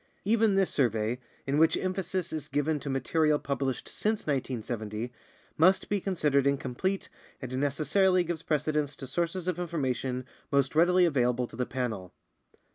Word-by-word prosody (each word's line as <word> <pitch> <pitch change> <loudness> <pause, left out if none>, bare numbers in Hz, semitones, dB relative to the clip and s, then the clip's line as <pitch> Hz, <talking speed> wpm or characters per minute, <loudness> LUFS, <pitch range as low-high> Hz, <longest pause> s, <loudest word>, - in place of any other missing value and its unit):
Even 220 0 +3
this 195 -1 +3
survey, 115 -2 +1 0.3
in 140 +2 +1
which 160 0 +5
emphasis 185 -1 -2
is 155 -2 -4
given 145 +2 0
to 140 - -5
material 150 +3 +2
published 135 -3 -2
since 215 0 -1
1970, 120 -4 -3 0.5
must 185 +4 +4
be 205 -2 0
considered 150 -8 +2
incomplete 140 +8 -1 0.3
and 130 -1 -5
necessarily 160 +7 +3
gives 170 -2 -3
precedence 150 -2 0
to 135 - -7
sources 170 +6 -2
of 180 -1 -1
information 130 -7 -2 0.3
most 140 -1 +2
readily 180 +3 +5
available 125 -5 +1
to 120 - -12
the 125 +1 -2
Panel. 110 -8 -3
145 Hz, 145 wpm, -29 LUFS, 130-175 Hz, 0.5 s, which